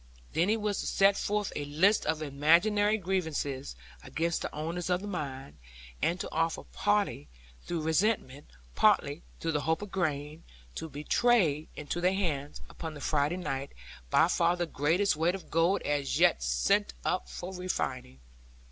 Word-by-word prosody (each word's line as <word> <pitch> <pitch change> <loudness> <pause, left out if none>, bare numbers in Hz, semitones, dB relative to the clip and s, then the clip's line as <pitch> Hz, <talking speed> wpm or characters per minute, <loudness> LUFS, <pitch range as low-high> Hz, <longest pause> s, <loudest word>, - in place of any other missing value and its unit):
Then 170 +4 +2
he 220 - +3
was 210 -2 -1
to - - -3
set 195 0 +4
forth 205 0 -1
a 145 - -2
list 165 +9 +3
of 155 0 0
imaginary 175 +9 +3
grievances 160 - -2 0.3
against 165 +1 -1
the - - -4
owners 165 +4 -4
of 180 0 +1
the 205 - -6
mine; 140 -8 -5 0.4
and 175 +2 +1
to - - -5
offer 165 0 0
partly 205 - 0 0.3
through 170 - -3
resentment, 160 -4 0 0.3
partly - - +3 0.2
through 165 - -1
the 150 -2 0
hope 160 +6 0
of 205 - -8
gain, 155 -4 -2 0.3
to 160 - -6
betray 155 0 +2
into 150 +3 -4
their 185 +2 +2
hands, 150 -7 -2
upon 160 -2 -7
the - - -8
Friday 150 +4 0
night, 140 -6 -4 0.4
by - - +5
far 170 +1 +2
the 175 -1 -1
greatest 160 +5 +1
weight 170 +4 +2
of 195 - -10
gold 170 +4 +2
as 145 -2 0
yet - - +4
sent - - +1
up - - -1
for 180 - -6
refining. 130 - -3
165 Hz, 165 wpm, -30 LUFS, 145-190 Hz, 0.4 s, by